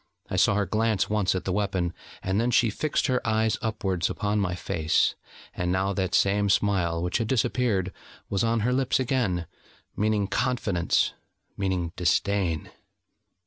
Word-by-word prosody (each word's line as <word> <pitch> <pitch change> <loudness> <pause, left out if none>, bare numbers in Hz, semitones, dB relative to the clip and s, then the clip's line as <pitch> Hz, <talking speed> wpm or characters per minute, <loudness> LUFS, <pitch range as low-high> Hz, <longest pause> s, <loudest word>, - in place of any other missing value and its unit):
I - - -1
saw - - +4
her 100 0 +1
glance 110 -1 0
once 100 -3 +1
at 95 - -3
the 95 - -1
weapon, 95 -4 -1 0.3
and 95 +3 +1
then 120 - +1
she 120 -2 +3
fixed 155 +7 -1
her 130 -3 +1
eyes 110 -1 +1
upwards 95 -6 -1
upon 105 0 -1
my 90 -3 0
face: 80 -2 +1 0.4
and 90 0 -2
now 95 +2 +1
that 95 -1 -1
same 100 +1 +2
smile, 90 -4 +1
which 90 +5 0
had 115 - -1
disappeared, 110 -5 0 0.3
was 100 - 0
on 115 0 +1
her 125 +4 +1
lips 130 0 +1
again, 115 -10 0 0.5
meaning 105 -1 +1
confidence, 100 -5 0 0.4
meaning 95 -4 -1
disdain. 90 -1 0
100 Hz, 155 wpm, -26 LUFS, 90-110 Hz, 0.5 s, saw